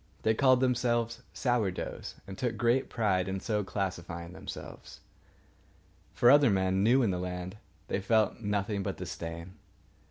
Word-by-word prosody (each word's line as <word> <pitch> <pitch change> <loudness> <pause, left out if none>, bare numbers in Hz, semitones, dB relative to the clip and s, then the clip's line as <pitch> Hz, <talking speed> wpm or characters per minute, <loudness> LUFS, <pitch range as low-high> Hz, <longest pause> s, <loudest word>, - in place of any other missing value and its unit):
They 110 - +3
called 130 +1 +4
themselves 120 -2 +1
Sour 120 -6 +1
doughs, 90 - -6
and 95 - -8
took 115 +2 -2
great 120 +3 +2
pride 95 -5 +1
in 95 0 -2
so 105 +1 -1
classifying 85 -3 -4
themselves. - - -9 1.1
For 120 - +6
other 145 -2 +6
men, 95 -1 +1
new 125 +5 +4
in 105 - +2
the 90 - -2
land, 90 +2 -5 0.3
they 100 - -1
felt 110 +2 +2
nothing 105 -1 -1
but - - -3
disdain. 85 +2 -7
105 Hz, 150 wpm, -30 LUFS, 95-120 Hz, 1.1 s, For